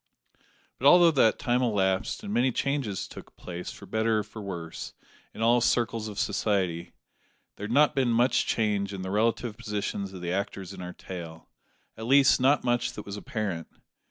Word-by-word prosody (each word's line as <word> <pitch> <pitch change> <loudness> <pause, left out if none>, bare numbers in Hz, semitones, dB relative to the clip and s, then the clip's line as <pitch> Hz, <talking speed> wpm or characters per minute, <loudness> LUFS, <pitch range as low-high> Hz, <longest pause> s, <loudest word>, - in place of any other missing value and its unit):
But 135 - +3
although 175 +2 +8
that 130 -7 +3
time 120 +1 +1
elapsed, 100 - 0
and 205 0 -4
many 130 +1 +3
changes 135 -7 -2
took - - -12
place, 90 0 -7
for - - -12
better 110 0 +1
or 105 - 0
for 105 +1 -10
worse, 85 -5 -6 0.4
in 115 - -5
all 120 +1 +4
circles 115 -2 +1
of 105 -2 -8
society, 95 -5 -1 0.6
there 105 - -5
had 105 - -5
not 145 +4 +5
been 130 -3 +1
much 120 +2 +2
change 105 -3 0
in 95 - -6
the 95 - -4
relative 110 +1 0
positions 100 -2 -3
of 95 -2 -9
the 85 0 -3
actors 95 -1 -4
in 95 - -9
our 90 0 -6
tale; 85 -3 -9 0.5
at 110 +1 -7
least, 135 0 +5
not 140 +3 +4
much 120 -1 0
that 105 - -8
was 100 - -6
apparent. 100 -5 -4
105 Hz, 185 wpm, -27 LUFS, 95-120 Hz, 0.6 s, although